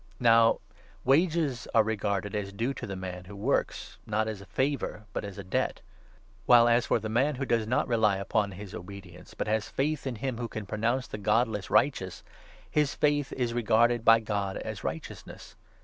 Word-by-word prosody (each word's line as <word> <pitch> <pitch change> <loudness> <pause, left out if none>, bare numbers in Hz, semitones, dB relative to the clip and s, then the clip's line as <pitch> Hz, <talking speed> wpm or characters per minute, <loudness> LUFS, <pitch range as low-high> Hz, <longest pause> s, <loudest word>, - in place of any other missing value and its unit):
Now 115 -2 +5 0.5
wages 150 -2 +2
are 110 - +6
regarded 100 -2 -2
as 100 -2 -3
due 115 +7 -2
to - - -7
the 95 - -5
man 90 -1 -6
who 100 +2 -10
works, 100 - -2
not 110 +1 +1
4 110 - -2
as 100 -2 -8
a 100 - -13
favour, 130 +1 -2
but - - -3
as 100 -1 -7
a 100 - -6
debt; 95 - -1 0.7
while, 120 -1 +7
as 120 0 +3
for - - +3
the 110 -1 -5
man 130 +7 +1
who 135 +2 -3
does 115 -3 +2
5 110 - -5
not 125 - +1
rely 110 -4 +2
upon 100 +1 -1
his 100 +1 -9
obedience, 90 -1 -10
but - - -2
has 110 0 -1
faith 145 +1 -1
in 130 - -3
him 125 +1 -3
who 120 - -2
can 110 -2 -6
pro 105 - -5
nounce 120 +4 +1
the 105 - -6
godless 105 -1 +1
righteous, 95 -10 +1 0.4
his 150 -2 +1
faith 145 -2 +1
is 120 -2 -1
regarded 120 0 +3
by 115 0 +7
God 100 -3 -2
as - - -6
righteousness. - - -7
110 Hz, 200 wpm, -28 LUFS, 100-125 Hz, 0.7 s, while